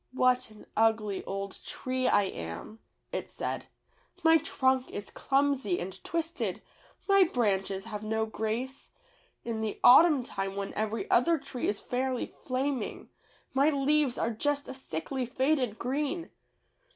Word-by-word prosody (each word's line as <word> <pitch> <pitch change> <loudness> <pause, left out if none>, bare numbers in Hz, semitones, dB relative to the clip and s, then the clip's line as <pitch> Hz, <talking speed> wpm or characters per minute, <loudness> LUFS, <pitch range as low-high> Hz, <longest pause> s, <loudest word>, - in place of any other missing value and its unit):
'What 255 -1 +3
an 215 -1 -15
ugly 220 -3 +2
old 195 0 -4
tree 255 0 -2
I 205 -4 +4
am,'^ 90 - -6 0.3
it - - -3
said; - - -4 0.6
"my 325 0 +7
trunk 260 -4 +1
is 205 - -6
clumsy 270 -9 +1
and 190 +1 -6
twisted, 335 0 -2 0.4
my 395 -1 +7
branches 195 - 0
have 210 -1 -6
no 220 +1 0
grace. 225 +5 -3 0.6
In 225 -2 -2
the 220 -1 -3
autumn 295 +1 +8
time 195 -4 -4
when 200 0 -4
every 215 +1 -2
other 330 +8 +4
tree 255 -3 -4
is 205 - 0
fairly 255 0 -1
flaming, 260 -2 -3 0.4
my 275 +3 +4
leaves 285 -2 +2
are 230 - 0
just 285 +5 -1
a - - -5
sickly 260 - -4
faded 255 -3 +1
green. 295 +6 -2
250 Hz, 140 wpm, -30 LUFS, 215-275 Hz, 0.6 s, autumn